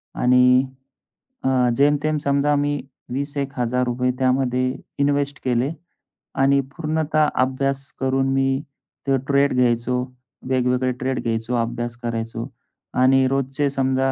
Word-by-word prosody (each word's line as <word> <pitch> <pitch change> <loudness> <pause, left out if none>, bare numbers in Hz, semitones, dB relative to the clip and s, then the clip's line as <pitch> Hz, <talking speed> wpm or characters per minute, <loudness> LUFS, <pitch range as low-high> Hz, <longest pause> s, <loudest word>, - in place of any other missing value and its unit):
आणि 125 +1 +5 0.8
अ, 130 -2 +2
जेमतेम 145 +2 +2
समजा 140 +1 +2
मी 145 0 0 0.3
वीस 140 +2 -1
एक 140 0 -2
हजार 125 +1 +1
रुपये 125 +1 0
त्यामध्ये 130 -1 +1 0.3
इन्वेस्ट 140 0 +1
केले. 125 +3 +1 0.6
आणि 140 +1 +3 0.2
पूर्णतः 155 -1 +1
अभ्यास 135 +1 0
करून 135 0 +1
मी 135 0 +1 0.5
ते 135 -1 +3
ट्रेड 140 0 +3
घ्यायचो, 125 0 +1 0.5
वेगवेगळे 125 0 +1
ट्रेड 130 +1 -2
घ्यायचो, 115 +1 -2
अभ्यास 120 +1 -3
करायचो 115 +1 -3 0.5
आणि 130 +1 +5
रोजचे 135 +1 0
समजा 135 -1 +1
130 Hz, 120 wpm, -22 LUFS, 125-140 Hz, 0.8 s, आणि